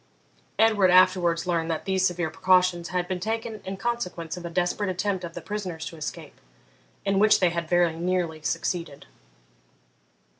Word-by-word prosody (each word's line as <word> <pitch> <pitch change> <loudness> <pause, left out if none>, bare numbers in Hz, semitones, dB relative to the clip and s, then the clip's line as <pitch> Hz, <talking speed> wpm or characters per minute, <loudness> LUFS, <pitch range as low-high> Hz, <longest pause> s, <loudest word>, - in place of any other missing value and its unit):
Edward 215 -4 +4
afterwards 180 -2 +4
learned 170 -2 -1
that 160 -1 -3
these 190 -1 +2
severe 175 -2 -2
precautions 180 0 +2
had 180 -1 -2
been 185 -1 -3
taken 225 +2 -3
in 190 +1 -5
consequence 180 -8 -3
of 180 - -9
a 170 - -5
desperate 180 +3 -1
attempt 185 0 -1
of 170 -1 -7
the - - -6
prisoners 185 -6 -5
to 180 - -7
escape, 155 -2 -7 0.6
in 195 -1 +2
which 215 +1 +5
they 180 -2 +3
had 170 -1 -3
very 175 -2 +3
nearly 170 -2 -1
succeeded. 165 -1 -3
180 Hz, 160 wpm, -26 LUFS, 170-190 Hz, 0.6 s, which